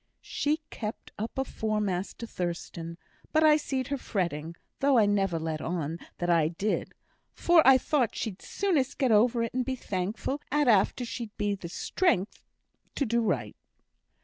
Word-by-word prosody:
She 305 +2 -1
kept 215 -1 -6
up 225 +5 -4
afore 220 -5 -1
Master 195 +2 -2
Thurstan, 170 -3 -5 0.3
but 315 0 +3
I 305 -1 +7
seed 270 -3 -2
her 280 - 0
fretting, 170 -7 -2 0.2
though 275 -1 +4
I 220 - +6
never 195 -4 +1
let 160 -1 -3
on 165 -1 -3 0.2
that 175 - -2
I 165 -3 +4
did, 190 +6 -2 0.4
for 345 -1 +5
I 265 -1 +9
thought 260 -2 0
she'd 200 -4 -4
soonest 300 -9 0
get 260 -4 +2
over 230 +2 +4
it 230 - -3
and 255 0 0
be 260 +1 -2
thankful 210 +7 -3
at 295 -1 +2
after 225 +3 +3
she'd 230 0 -5
the 200 -4 -2
strength 215 - 0 0.5
to 280 - +1
do 235 0 +1
right. 225 - -1
220 Hz, 160 wpm, -28 LUFS, 180-265 Hz, 0.5 s, I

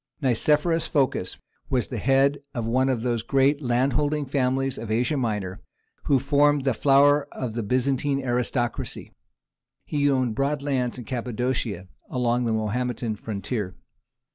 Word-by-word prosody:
Nicephorus 150 +5 +2
Phocas 130 -10 0 0.3
was 125 -2 0
the 120 - -4
head 135 +4 +3 0.2
of 120 -2 -2
one 130 +3 +2
of 120 -4 -1
those 120 -2 0
great 135 +4 +2
landholding 140 +4 +1
families 135 -1 0
of 115 - -6
Asia 120 +7 +1
Minor 105 -8 -2 0.4
who 140 - +4
formed 145 +2 +3
the 135 -2 +2
flower 140 +3 +4
of 125 -4 -4
the 115 - -2
Byzantine 135 +5 0
aristocracy; 120 -1 -2 0.7
he 145 -1 +1
owned 130 -4 +1
broad 140 +4 -1
lands 130 -4 -1
in 125 - -8
Cappadocia, 120 -4 -2 0.2
along 125 -1 0
the 115 - 0
Mahometan 110 +1 -1
frontier. 105 -2 -4
130 Hz, 140 wpm, -25 LUFS, 120-140 Hz, 0.7 s, who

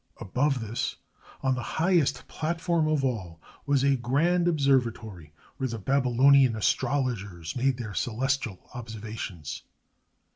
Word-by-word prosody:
Above 135 +5 0
this, 115 +1 -3 0.5
on 130 -1 +2
the 130 - -3 0.2
highest 170 -3 +2
platform 165 0 0
of 150 -3 +1
all, 95 -10 -3 0.3
was 140 -2 +3
a 140 0 +4
grand 155 +9 +1
observatory, 120 - 0 0.3
where 130 - -1
the 115 - -4
Babylonian 130 +2 +4
astrologers 105 - -1
made 130 0 +1
their 110 -4 -6
celestial 125 -2 -2
observations. 110 -9 -6
130 Hz, 115 wpm, -27 LUFS, 110-140 Hz, 0.5 s, a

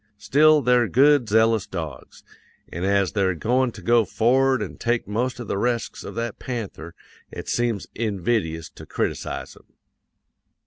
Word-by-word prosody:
Still, 150 +6 +4
they're 125 -2 +3
good, 140 -1 +4
zealous 110 -1 +3
dogs; 80 -6 -7 0.5
an' 85 - -4
as 100 0 +2
they're 95 -3 +1
going 125 +7 +1
to - - -12
go 120 -1 +4
for'ard 130 +4 +2
an' 100 - -8
take 120 -2 -1
most 125 +5 -2
of 120 - -6
the 100 - -2
resks 120 +1 -2
of - - -8
that 115 -1 -4
panther, 100 -9 -6 0.3
it - - -8
seems 120 -4 -1
invidious 100 -6 -1
to - - -13
criticize - - -3
'em. - - -23
115 Hz, 150 wpm, -23 LUFS, 100-125 Hz, 0.5 s, Still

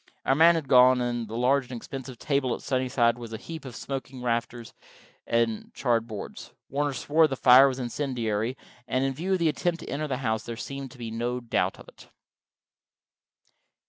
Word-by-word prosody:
Our 135 - +4
man 165 +4 +6
had 160 -4 -3
gone, 125 -1 +6
and 120 -2 -2
the 110 - -7
large 130 +2 +2
and 125 - -5
expensive 130 +2 -7
stable 135 -1 0
at - - -12
Sunnyside 125 -3 +1
was 115 -2 -8
a - - -3
heap 160 +6 -9
of 125 -3 -8
smoking 130 -1 -6
rafters 120 -1 -2 0.5
and 115 -2 0
charred 115 -3 +1
boards. 105 -3 -8 0.2
Warner 145 +1 -1
swore 155 +5 +3
the 135 - -3
fire 130 +1 +7
was 130 -2 -2
incendiary, 120 -3 -2 0.3
and 130 +1 0
in 135 - 0
view 175 +8 -2
of - - +3
the 170 -2 +1
attempt 170 +3 -1
to - - -9
enter 150 +2 -2
the 130 -3 -2
house, 110 -4 -1
there 115 -1 -6
seemed 135 +2 -6
to 125 - -15
be 115 -2 -6
no 120 +2 -2
doubt 120 -2 -1
of - - -14
it. - - -16
125 Hz, 195 wpm, -27 LUFS, 120-140 Hz, 0.5 s, fire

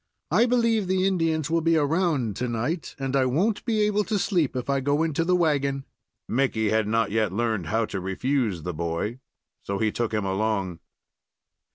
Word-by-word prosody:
I 240 - +4
believe 230 -4 +2
the 185 0 +1
Indians 165 -5 0
will 165 0 +2
be 165 0 +3
around 150 - +1
to 125 - -1
night, 125 +9 -3
and 135 -1 -2
I 135 -1 +3
won't 190 - +1
be 220 -3 +1
able 210 0 +2
to 215 +1 0
sleep 175 - 0
if 125 - -3
I 140 0 +1
go 145 +3 +1
into 165 0 0
the 180 +2 +2
wagon." 140 -5 +1 0.4
Mickey 115 -4 +1
had 110 -1 +2
not 115 -1 +1
yet 110 -3 +1
learned 110 -4 -1
how 110 +5 +1
to 100 - -4
refuse 100 - -1
the 90 - -3
boy, 85 +1 -2
and 120 +4 -6 0.4
so 100 - -3
he 110 +1 +1
took 120 0 -2
him 105 -2 -1
along. 95 -3 -1
135 Hz, 195 wpm, -25 LUFS, 110-165 Hz, 0.4 s, I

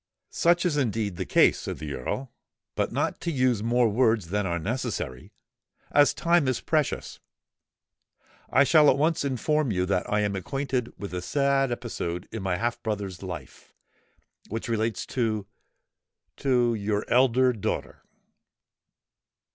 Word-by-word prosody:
"Such 175 +1 +2
is 160 -5 +1
indeed 110 -8 -1
the 95 - -4
case," - - +4
said - - -5
the 75 -2 -5
Earl. 120 - -4 0.4
"But - - -1
not - - -1
to 170 - -2
use 130 -6 +1
more 120 +2 +3
words 110 -4 +2
than 105 +1 0
are 85 -1 -1
necessary—as 115 - -2
time 170 -4 +2
is 130 -2 0
precious—I 145 -3 -4
shall 150 0 +6
at 130 - +3
once 155 +2 +1
inform 140 +2 0
you 90 -2 0
that 95 -1 -1
I 105 0 +2
am 100 -1 -1
acquainted 125 +3 -2
with 100 -3 -6
the 90 0 -3
sad 140 +3 +1
episode 95 -7 -4
in 115 - -5
my 95 -2 -1
half 120 +3 -2
brother's 100 -5 -4
life, 85 -8 -9 0.7
which 115 +2 -4
relates 110 -2 -1
to—to—your 110 0 -3
elder 125 0 +4
daughter." 110 - -4
115 Hz, 130 wpm, -26 LUFS, 100-135 Hz, 0.7 s, shall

